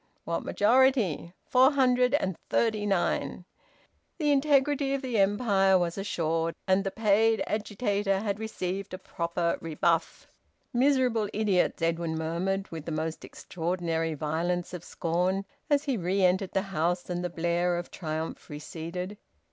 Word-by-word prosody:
"What 170 0 -2
majority?" 225 - +2
"Four 260 +3 +5
hundred 250 -1 +3
and 190 - 0
thirty 215 -3 +1
nine." 180 -1 0 0.7
The 295 -3 +1
integrity 280 -1 +2
of 275 - -5
the 245 -5 0
empire 195 -2 +3
was 175 -2 -1
assured, 165 -4 -1
and 190 +1 +3
the 195 - -1
paid 220 +2 +2
agitator 205 -2 -1
had 205 -1 -2
received 195 -3 -4
a - - -7
proper 170 -2 -2
rebuff. 165 +1 0 0.5
"Miserable 250 -4 +2
idiots!" 200 -5 +1
Edwin 165 0 0
murmured, 175 +5 -2
with 160 -2 -6
the 165 - -4
most 160 +1 -3
extraordinary 165 -2 -3
violence 170 +4 -2
of 175 -2 -6
scorn, 180 +4 -1 0.2
as 290 -1 +3
he 270 -5 -1
re 190 +1 0
entered 185 +1 +1
the 190 - +1
house, 175 +2 0
and 175 0 -3
the 180 - -1
blare 175 +1 0
of 175 - -6
triumph 160 -2 -5
receded. 170 +6 -6
190 Hz, 140 wpm, -28 LUFS, 170-220 Hz, 0.7 s, Four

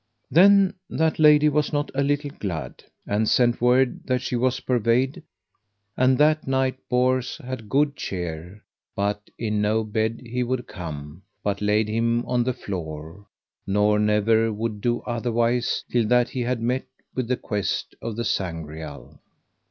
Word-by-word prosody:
Then 195 +5 +6 0.2
that 160 0 0
lady 150 -1 +6
was 150 0 +1
not 145 -1 -1
a 135 - 0
little 145 +1 0
glad, 90 - -5 0.2
and 105 +2 0
sent 120 -2 +3
word 125 +1 +3
that 130 -1 +1
she 125 - -2
was 130 +1 +1
purveyed, 125 +2 +1 0.7
and 130 0 +3
that 155 +1 +3
night 130 -1 0
Bors 125 0 +1
had 130 -7 -7
good 145 +1 +2
cheer; 90 0 -6 0.3
but 105 +1 -2
in 105 -2 -1
no 110 +2 +1
bed 110 +1 -1
he 125 +2 -3
would 125 0 -1
come, 75 -1 -8 0.2
but 100 -1 -1
laid 105 +1 +2
him 115 +2 0
on 125 -1 +1
the 130 - 0
floor, 85 -3 -7 0.4
nor 105 +1 +3
never 110 +2 +3
would 110 -1 -3
do 120 +1 0
otherwise 120 0 0
till 120 -3 +2
that 125 +1 +3
he 130 - -3
had 120 -1 -1
met 125 +3 -1 0.3
with 130 -3 -2
the 125 0 0
quest 105 -3 -3
of 115 -2 -4
the 120 +1 -3
Sangreal. 80 -5 -5
115 Hz, 155 wpm, -24 LUFS, 105-130 Hz, 0.7 s, Then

